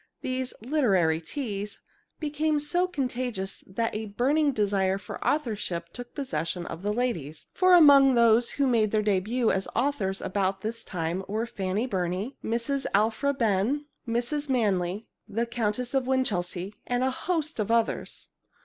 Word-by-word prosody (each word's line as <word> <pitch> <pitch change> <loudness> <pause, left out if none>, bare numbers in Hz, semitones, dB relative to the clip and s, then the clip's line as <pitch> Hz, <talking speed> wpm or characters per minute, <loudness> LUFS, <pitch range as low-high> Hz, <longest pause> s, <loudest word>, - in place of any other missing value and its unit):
These 255 0 -3
"literary 195 - +2
teas" 205 - -4 0.4
became 300 0 0
so 350 +5 +1
contagious 250 - -3
that 225 +4 -2
a 215 0 -3
burning 280 +8 +2
desire 195 -4 +1
for 195 - -7
authorship 210 - -1
took 245 0 -9
possession 170 - -3
of 165 0 -7
the 205 +2 -1
ladies, 170 - -2
for 370 -1 +5
among 280 -5 +7
those 235 0 +5
who 280 - +3
made 230 -5 +3
their 215 0 +1
debut 215 +4 +1
as 190 0 -1
authors 230 -8 0
about 195 0 -1
this 225 +2 -3
time 175 +1 -3
were 220 +3 -1
Fanny 200 0 -2
Burney, 190 +3 -2
Mrs. 240 +5 -1
Alphra 220 +7 +2
Behn, 230 +5 +1 0.2
Mrs. 245 +6 -1
Manley, 205 -5 0 0.2
the 230 +3 -1
Countess 235 +1 -2
of 265 -2 +1
Winchelsea, 200 -7 -1
and 245 +1 0
a 260 - +2
host 320 0 -2
of 215 - -1
others. 230 -1 -1
230 Hz, 150 wpm, -27 LUFS, 195-265 Hz, 0.4 s, among